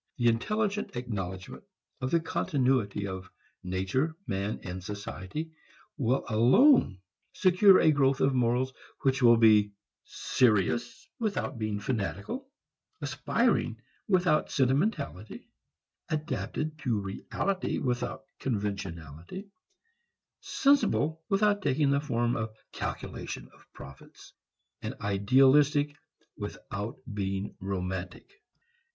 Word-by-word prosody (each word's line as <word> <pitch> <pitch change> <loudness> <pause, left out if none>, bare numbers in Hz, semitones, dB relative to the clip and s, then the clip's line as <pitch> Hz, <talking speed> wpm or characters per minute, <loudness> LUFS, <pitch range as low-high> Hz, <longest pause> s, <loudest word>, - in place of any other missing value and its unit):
The 120 -2 +4
intelligent 210 - -1
acknowledgment 95 -6 -5 0.4
of 130 - -1
the 170 - +3
continuity 130 -10 0
of 95 -1 -6 0.3
nature, 95 - -1
man 100 +1 -2
and 90 0 -6
society 100 - -6 0.4
will 130 -2 0
alone 120 - +5 0.4
secure 185 +1 +6
a 155 - +5
growth 135 -2 +2
of 135 - +3
morals 125 +1 +1 0.3
which 135 0 +2
will 120 -1 +7
be 105 -2 +5 0.3
serious 115 -2 +1
without 200 - -2
being 110 -2 -2
fanatical, 110 - -3 0.5
aspiring - - 0 0.3
without 180 -6 +2
sentimentality, 135 - -1 0.6
adapted 155 0 -3
to 120 -7 0
reality 185 - -2
without 125 +1 -2
conventionality, 100 - -5 0.9
sensible 215 - +2
without 205 +1 +3
taking 145 -2 +2
the 140 0 +2
form 120 -5 0
of 110 -1 -4 0.2
calculation - - -5
of - - -23
profits, 70 0 -13 0.5
idealistic 135 +8 +3 0.4
without 105 +3 -6 0.2
being 100 0 -3
romantic. 95 - -5
125 Hz, 95 wpm, -29 LUFS, 100-155 Hz, 0.9 s, will